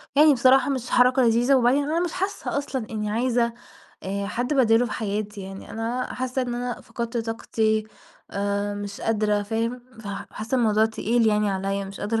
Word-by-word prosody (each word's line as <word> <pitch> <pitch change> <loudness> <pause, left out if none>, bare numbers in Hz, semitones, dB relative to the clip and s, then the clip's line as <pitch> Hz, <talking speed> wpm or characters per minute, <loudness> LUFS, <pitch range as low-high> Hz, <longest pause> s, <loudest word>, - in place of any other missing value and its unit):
يعني 300 +1 +7
بصراحة 260 +1 +4
مش 255 -3 -2
حركة 250 +2 +4
لذيذة 240 +3 +4
وبعدين 260 +3 +3
أنا 310 +4 0
مش 345 -2 -1
حاسة 385 -4 -2
أصلًا 265 -5 -3
إني 210 -1 -3
عايزة 235 +1 +1 0.5
آآ 200 +1 -3
حد 245 +7 -1
بداله 235 -3 +4
في - - -5
حياتي 210 -1 -3
يعني، 195 0 -9
أنا 235 +3 -3
حاسة 255 +1 -2
إن 245 -1 -3
أنا 245 0 -3
فقدت 235 0 -5
طاقتي 220 -1 0 0.5
آآ 200 0 -1
مش 205 -1 -6
قادرة، 210 -2 +1
فاهم، 230 +3 -2 0.2
فحاسة 215 +3 -5
الموضوع 220 -3 +3
تقيل 225 +1 +1
يعني 210 -1 +2
عليَّ، 195 +1 -2
مش 195 0 -9
قادرة 225 +2 0
225 Hz, 170 wpm, -24 LUFS, 210-250 Hz, 0.5 s, يعني